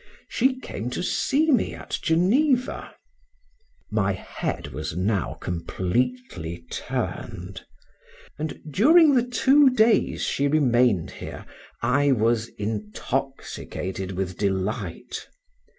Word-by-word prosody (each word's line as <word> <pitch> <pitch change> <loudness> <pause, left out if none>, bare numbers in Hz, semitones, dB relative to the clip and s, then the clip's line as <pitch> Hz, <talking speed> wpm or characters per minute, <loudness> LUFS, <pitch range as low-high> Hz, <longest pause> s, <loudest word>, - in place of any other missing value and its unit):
She 260 +1 +1
came 120 - -5
to - - -2
see 305 +11 +2
me 245 -7 +2
at - - -5
Geneva. 245 - +2 1.0
My 100 -2 +1
head 95 - -4
was 75 +4 -5
now 95 -1 0
completely 90 -1 -3
turned; 95 +1 -4 0.8
and 155 0 -4
during 305 - +6
the 250 - +5
two 270 +3 +5
days 225 -2 +3
she 140 - +1
remained 125 - +3
here, - - -8 0.4
I 140 +4 +3
was 115 -1 +1
intoxicated 105 -2 -4
with 90 -1 -3
delight. 95 +1 -2
120 Hz, 100 wpm, -25 LUFS, -, 1.0 s, during